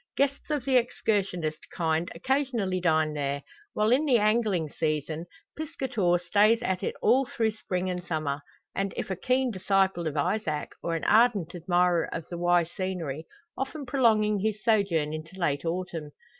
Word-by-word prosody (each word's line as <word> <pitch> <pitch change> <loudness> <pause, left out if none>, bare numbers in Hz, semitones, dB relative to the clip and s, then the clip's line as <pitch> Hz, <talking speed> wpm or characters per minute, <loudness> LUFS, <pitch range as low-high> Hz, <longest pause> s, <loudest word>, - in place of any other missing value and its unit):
Guests 280 +2 0
of 295 -4 -1
the 265 -2 +4
excursionist 195 -9 -1
kind 165 -1 0
occasionally 235 -3 0
dine 155 -3 +2
there; 140 -1 -2 0.3
while 215 +1 +2
in 275 +5 +4
the 255 -4 +5
angling 210 -6 +2
season, 155 +1 -2 0.3
piscator 245 - 0
stays 205 +6 +3
at 190 -5 -1
it - - -2
all 255 +5 +5
through 225 -2 0
spring 185 -4 -3
and 180 -1 -3
summer; 155 -4 -2 0.3
and 195 0 -2
if - - -3
a - - 0
keen 255 +6 +1
disciple 190 -3 +1
of 155 - -3
Izaak, 155 -1 -1
or 170 - -1
an 165 - -3
ardent 215 -7 +3
admirer 175 0 +2
of 165 -1 -5
the 175 - -5
Wye 175 0 +4
scenery, 165 -4 -4 0.3
often 275 +2 -4
prolonging 220 -5 +3
his 215 +1 -2
sojourn 185 -9 +2
into 160 +4 -7
late 145 -3 0
autumn. 165 -3 -3
185 Hz, 160 wpm, -28 LUFS, 165-220 Hz, 0.3 s, the